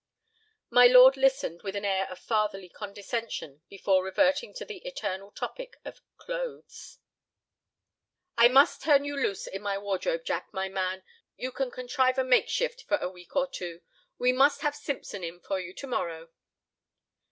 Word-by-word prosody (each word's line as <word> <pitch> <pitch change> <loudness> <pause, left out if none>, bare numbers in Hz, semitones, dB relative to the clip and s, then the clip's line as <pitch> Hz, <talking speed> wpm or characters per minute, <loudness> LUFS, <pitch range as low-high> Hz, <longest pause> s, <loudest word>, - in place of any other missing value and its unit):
My 245 +1 +8
lord 255 +2 +9
listened 265 -10 +1
with 195 -1 -5
an 200 0 -3
air 195 -1 0
of 185 - -8
fatherly 210 -3 -1
condescension 205 - -6
before 190 -1 +1
reverting 280 - +1
to - - -6
the 435 - -8
eternal 200 - -5
topic - - -7
of - - -9 0.2
clothes. - - -7 1.4
"I 235 -1 +8
must 270 +3 +5
turn 285 -2 +4
you 285 0 -3
loose 255 -8 -1
in 195 - -6
my 200 -1 -2
wardrobe, 205 - -2
Jack, - - -3
my 190 -1 -3
man. 190 0 -2 0.3
You 255 - -4
can 270 0 -2
contrive 255 +1 0
a 260 - +3
makeshift 475 - +1
for 300 - +2
a 235 - -3
week 180 +5 -16
or 275 -1 +3
two. 175 -10 -7 0.4
We 250 0 +3
must 275 +3 +4
have 295 -1 0
Simpson 265 - -5
in 170 +1 -6
for 195 +1 -3
you 185 -1 -6
to - - -7
morrow." 165 -10 -3
235 Hz, 165 wpm, -28 LUFS, 190-275 Hz, 1.4 s, lord